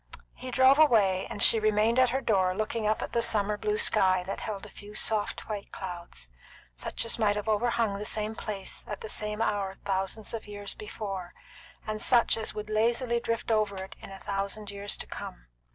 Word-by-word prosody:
He 255 - -8
drove 260 +3 +5
away, 210 -11 +4
and 205 - +1
she 225 - +6
remained 215 +3 +3
at 255 -1 +5
her 265 +3 0
door 185 -6 +2
looking 215 +1 -1
up 215 - +1
at - - -6
the 235 - +2
summer 210 -2 0
blue 210 0 -1
sky 185 -4 +3
that 190 - -4
held 210 -2 -5
a - - -10
few 205 +2 -12
soft 215 -1 0
white 210 -2 -5
clouds, 175 - -7 0.5
such - - -1
as 230 - -1
might 205 -2 +3
have 210 +1 -4
overhung 220 -1 +1
the - - -4
same 215 +1 0
place 210 -3 -4
at 210 - -5
the 220 - -6
same 210 +1 -1
hour 200 -3 -1
thousands 195 +3 -1
of 225 -2 -5
years 205 -1 -4
before, 195 -4 -6 0.5
and 215 0 -3
such 240 -2 +4
as 220 -1 -4
would 210 0 -5
lazily 235 +3 +1
drift 230 0 -2
over 210 -3 +1
it 190 0 -7
in - - -9
a 195 - -8
thousand 200 +1 -3
years 200 0 0
to - - -7
come. - - -8
210 Hz, 200 wpm, -29 LUFS, 200-225 Hz, 0.5 s, she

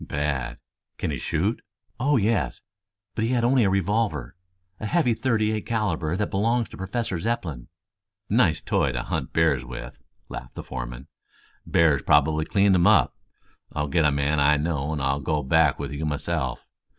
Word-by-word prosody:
"Bad. 70 -3 -2 0.4
Can - - -2
he 70 - -3
shoot?" - - -1 0.4
"Oh, 145 +2 +3
yes. 105 - 0 0.5
But 110 - -2
he 115 - +1
had 120 -2 +1
only 125 0 +4
a 100 - +3
revolver 95 - 0 0.4
a 110 - -3
heavy 150 -4 +2
thirty 110 -3 +1
eight 110 -1 -3
calibre 100 -7 -1
that 105 - -2
belongs 115 +4 +1
to - - -11
Professor 95 -1 -3
Zepplin." 80 - -3 0.6
"Nice 100 -8 +3
toy - - +1
to - - -2
hunt - - -3
bears 80 -5 +2
with," 60 -1 -8 0.3
laughed 60 - -8
the - - -6
foreman. - - -6 0.6
"Bear's 75 -5 +3
probably 75 +1 +3
cleaned 100 0 +3
him 90 +1 +4
up. 105 -4 +4 0.6
I'll 75 -1 -2
get 85 +2 +2
a 75 - +4
man 70 +2 +1
I 70 +1 +4
know 75 -1 -1
and 75 -3 -2
I'll 70 +1 +1
go 75 +1 -1
back 75 +1 +3
with 70 -1 -5
you 70 +2 -4
myself. 75 -3 -2
80 Hz, 175 wpm, -25 LUFS, 70-105 Hz, 0.6 s, only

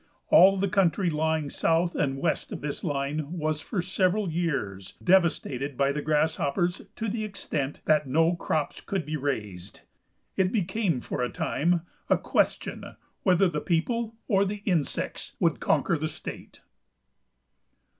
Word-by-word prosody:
All 195 +3 +7
the 200 +1 +1
country 185 -2 +2
lying 155 -1 0
south 170 +2 +1
and 135 -2 0
west - - -1
of - - -5
this 145 -1 -4
line 145 +1 -2
was 155 -1 -1
for 180 0 -2
several 185 +1 +1
years 135 - -2
devastated 145 -7 +2
by 140 0 +3
the 150 +1 -2
grasshoppers 160 +3 +1
to 225 - -3
the 220 +1 -2
extent 155 -9 -3
that 150 -2 +3
no 165 +6 +3
crops 155 -3 -2
could 190 -6 -3
be 155 +1 -3
raised. 105 -10 -4 0.5
It 190 -1 +2
became 190 - 0
for - - -4
a 125 - 0
time 170 +2 0 0.3
a - - +5
question - - -1 0.3
whether 185 0 +4
the 150 -4 -2
people 225 +7 0
or 195 -3 +3
the 200 +1 -4
insects 170 -8 -2
would - - +2
conquer - - +1
the - - -1
state. - - -9
165 Hz, 145 wpm, -27 LUFS, 145-190 Hz, 0.5 s, All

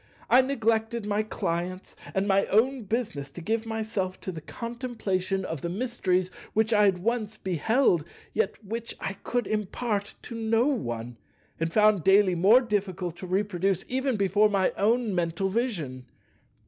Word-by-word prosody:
I 255 - +8
neglected 230 -3 0
my 210 0 +1
clients 185 -3 -3 0.2
and 195 +1 +1
my 195 0 +3
own 240 +3 +2
business 195 - -2
to 140 - -10
give 220 +6 -1
myself 220 -4 -3
to 185 - -4
the 160 -3 -7
contemplation 205 - -3
of 160 -4 -4
the 170 - -3
mysteries 185 -4 0 0.2
which 220 +1 +2
I 210 -1 +5
had 195 -2 +3
once 225 -2 -1
beheld, 185 - +2 0.3
yet 450 - 0
which 230 +3 -4
I 195 - -3
could 245 -1 -1
impart 210 0 -2
to - - -8
no 225 +1 +1
one, 120 - -2 0.4
and 165 0 -1
found 210 -2 +4
daily 195 0 +5
more 200 +9 +6
difficult 195 -6 -2
to 185 - -7
reproduce 190 -1 0
even 265 0 0
before 205 +1 +3
my 195 -2 +2
own 225 +1 +1
mental 175 +2 0
vision. 170 - -2
205 Hz, 155 wpm, -27 LUFS, 185-230 Hz, 0.4 s, I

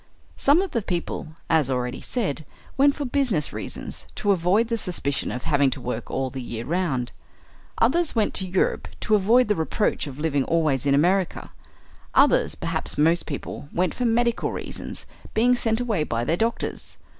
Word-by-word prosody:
Some 295 +7 +4
of 390 - -5
the 230 - 0
people, 170 -4 -4
as 155 -5 +3
already 125 -1 -2
said, 190 - -2 0.3
went 280 +1 +4
for 290 - -3
business 245 - 0
reasons, - - -6
to 205 - +1
avoid 190 +5 +3
the 230 0 -1
suspicion 145 -8 -1
of 125 - -5
having 145 -4 +3
to 130 - -4
work 120 -2 -4
all 130 -1 -2
the 135 - -5
year 120 -1 -5
round. 150 -8 -1 0.7
Others 300 +7 +2
went 220 -2 +1
to 190 - 0
Europe 185 +1 0
to 215 - 0
avoid 220 +5 +5
the 210 - +3
reproach 160 -1 0
of 135 -2 -8
living 150 -3 +1
always 150 -5 +1
in 140 - +4
America. 180 +5 +1 0.6
Others, - - +4
perhaps - - -3
most 165 +3 +3
people, 140 -1 -6
went 180 +1 0
for 250 - -2
medical 235 0 +1
reasons, - - -6 0.3
being 240 +3 +4
sent 225 -2 +1
away 225 -10 0
by 115 -5 -2
their 155 +7 +1
doctors. 230 +3 -2
175 Hz, 175 wpm, -24 LUFS, 140-230 Hz, 0.7 s, avoid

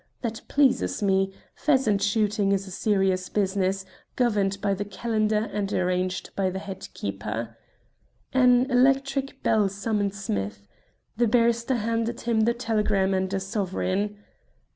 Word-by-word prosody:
That 230 -1 -3
pleases 240 - +2
me. 195 -1 +2 0.2
Pheasant 260 -9 +2
shooting 205 -1 +1
is 195 0 0
a 190 - -10
serious 190 -2 +1
business, 195 -1 0 0.3
governed 205 -5 +1
by 200 -1 +1
the 195 +1 -2
calendar 215 +1 0
and 205 -1 -2
arranged 185 0 -1
by 190 -1 +1
the 185 - -4
head 190 -1 -7
keeper." 110 +3 -4 0.8
An 250 -1 +5
electric 270 +2 +2
bell 210 -3 +3
summoned 205 0 -1
Smith. 100 - -4 0.5
The 240 0 +3
barrister 235 +2 +2
handed 230 +1 -1
him 225 -2 +2
the 235 +1 +2
telegram 210 -5 +1
and 190 0 0
a 195 - 0
sovereign. 195 0 -2
205 Hz, 135 wpm, -26 LUFS, 190-230 Hz, 0.8 s, An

